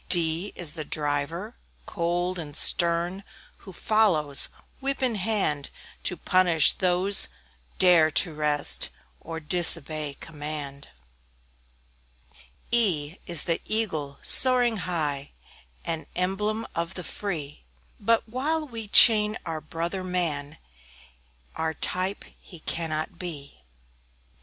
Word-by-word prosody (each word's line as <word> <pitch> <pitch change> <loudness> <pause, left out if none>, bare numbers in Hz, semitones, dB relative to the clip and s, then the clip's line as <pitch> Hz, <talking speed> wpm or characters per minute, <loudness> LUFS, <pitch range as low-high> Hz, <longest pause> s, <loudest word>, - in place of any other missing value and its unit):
D 170 +2 +3
D - - -20
is 165 -4 -1
the 160 -2 -5
Driver, 150 +8 -3 0.3
cold 175 +1 -3
and 145 -3 -8
stern, 175 +3 +3 0.3
Who 195 - -13
follows, 175 -9 +1 0.3
whip 275 0 -3
in 250 -2 +1
hand, 190 -9 -1 0.4
To - - -1
punish 175 -5 +3
those 185 +2 +2
who - - -18 0.5
dare 175 -4 +4
to 160 +2 +2
rest, 145 - +1 0.3
Or 165 0 -8
disobey 155 -3 +2
command. 150 -3 -6 1.8
E 190 -12 +2
E 180 - -20
is 170 -3 +4
the 165 - -2
Eagle, 160 -11 -3
soaring 245 -3 +7
high; 150 -7 -4 0.5
An 165 -1 -4
emblem 210 +5 -2
of 170 +2 -4
the 180 - -6
free; 160 -7 -6 0.4
But 230 +3 0
while 300 +7 -2
we 230 -4 -8
chain 210 0 +6
our 160 -2 -5
brother 170 +5 -5
man, 155 -5 -3 1.0
Our 160 0 -3
type 185 +6 -1
he 175 -4 -14
cannot 165 +3 -4
be. 145 - -9
170 Hz, 115 wpm, -25 LUFS, 155-200 Hz, 1.8 s, soaring